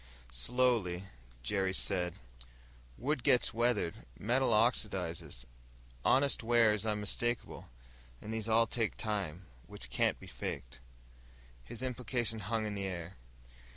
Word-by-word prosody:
Slowly, 110 - +1 0.4
Jerry 95 +6 +1
said, 90 -3 +1 0.8
"Wood 135 +3 0
gets 125 - +3
weathered, 115 - 0
metal 125 +5 +2
oxidizes, 95 - +1 0.6
honest 140 +1 +4
wear 115 -2 +5
is 105 +1 -2
unmistakable. 110 +3 -1 0.5
And 110 - -6
these 110 0 -2
all 115 +1 +5
take 115 -1 -1
time, 95 -5 -2 0.2
which - - -5
can't - - +2
be - - -11
faked." - - -5 0.8
His 115 - -5
implication 120 -3 -1
hung 110 +2 -1
in 105 - -2
the 100 -1 -3
air. 90 -1 -5
110 Hz, 120 wpm, -34 LUFS, 95-120 Hz, 0.8 s, wear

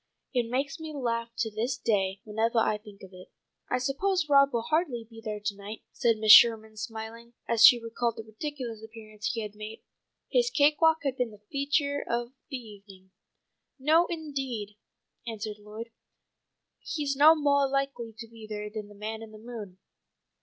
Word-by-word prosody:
It 240 -3 0
makes 275 +5 -2
me 315 -1 -7
laugh 230 -3 -2
to 225 -2 -1
this 235 +5 -2
day, 195 -3 0
whenevah 225 +2 0
I 210 - 0
think 210 -2 -15
of 190 0 -12
it." 185 0 -12 0.4
"I 250 - +1
suppose 310 +7 0
Rob 280 -1 +5
will 235 -1 -1
hardly 305 -5 0
be 225 -1 -13
there 210 -2 -4
to 205 0 -3
night," 200 +2 -9
said 235 -3 +2
Mrs. 215 0 +4
Sherman, 220 -2 +8
smiling 225 +2 -7
as 230 -1 +3
she 245 - +10
recalled 230 0 -2
the 225 - -6
ridiculous 230 0 -6
appearance 215 -2 -8
he 230 -2 -3
had 210 -1 -6
made. 215 +1 -9 0.4
His 485 -1 +2
cake 295 -6 +3
walk 320 0 +4
had 270 -2 -1
been 250 -2 0
the 210 -1 -16
feature 285 0 0
of 240 +1 -1 0.2
the 270 - -3
evening. 200 -5 -14 0.7
"No, 315 +5 +4
indeed," 270 - -4 0.5
answered 215 -2 -5
Lloyd. 215 +3 -9 0.9
"He's 290 -3 -2
no 305 +4 +8
moah 285 -2 +3
likely 275 -4 -2
to 230 0 -8
be 225 -1 -12
there 210 -1 -5
than 215 -1 -6
the 205 - -15
man 220 +2 -5
in 225 -1 -10
the 215 - -11
moon. 215 -5 -9
230 Hz, 180 wpm, -28 LUFS, 215-275 Hz, 0.9 s, she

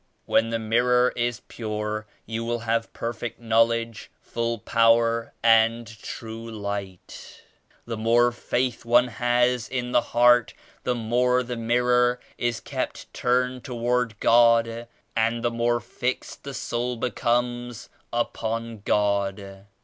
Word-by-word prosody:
When 115 - +2
the 115 - 0
mirror 125 +3 +2
is 120 0 -1
pure 105 -1 -4 0.2
you 115 +1 -4
will 120 0 -2
have 115 0 -1
perfect 115 0 -5
knowledge, 115 0 +1
full 115 0 -3
power 115 +1 +2
and 115 0 +4
true 115 0 -7
Light. 100 -4 -7 0.4
The 115 -1 -4
more 120 +2 +3
Faith 125 +1 -2
one 120 +1 +4
has 120 +1 +1
in 125 -1 -3
the - - +4
heart, 120 0 +3 0.3
the 125 - +1
more 125 +2 +1
the 125 0 -5
mirror 125 +1 +2 0.2
is 120 -1 -1
kept - - -5
turned 125 0 0
toward 120 -3 -1
God 115 0 +4 0.3
and 115 +1 +1
the 120 - +1
more 120 0 +1
fixed 125 +4 -4
the 140 -1 -6
soul 120 +1 -2
becomes 120 -1 -1 0.2
upon 115 -1 -3
God. 100 -1 -1
115 Hz, 125 wpm, -25 LUFS, 115-120 Hz, 0.4 s, and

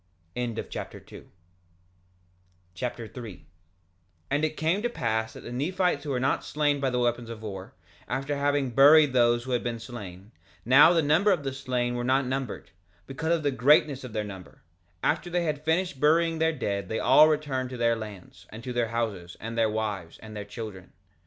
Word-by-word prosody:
Alma 120 -2 -2
Chapter - - -7
3 - - -13 1.5
3:1 115 -1 -6 0.9
And 145 +2 +1
it 155 0 -1
came 165 +6 +1
to 240 - 0
pass 110 - -2
that - - -10
the - - -9
Nephites 175 +4 0
who - - -4
were 130 -3 0
not 130 +1 0
slain 145 -1 0
by 135 -1 0
the 125 - -1
weapons 120 -1 0
of 115 -1 -8
war, 95 -3 -7 0.3
after 135 +2 -2
having 140 -2 0
buried 145 +2 +7
those 120 -1 +3
who 130 - -6
had 120 -2 0
been 120 -1 -2
slain—now 115 - +1
the 165 -2 +2
number 160 +8 +3
of 175 -6 +1
the 135 -1 -3
slain 125 -2 -2
were 120 0 -2
not 130 +2 +2
numbered, 130 -2 -4 0.3
because 160 +5 -1
of 160 - -4
the 145 - +1
greatness 135 +2 +3
of 125 - -7
their 110 - -1
number—after 90 - -5
they 175 0 0
had 150 -2 -2
finished 160 -2 0
burying 165 +2 +3
their 160 0 +3
dead 100 - -3
they 110 - -1
all 135 +5 +7
returned 145 -4 -1
to 125 - -7
their 115 -1 +2
lands, 100 -4 -10
and 110 +2 -10
to 125 - -5
their 120 -1 0
houses, 110 -7 -3
and 115 +1 -6
their 115 -1 +2
wives, 105 -6 -3
and 110 -1 -11
their 105 - -4
children. 105 -3 -8
125 Hz, 185 wpm, -27 LUFS, 110-145 Hz, 1.5 s, buried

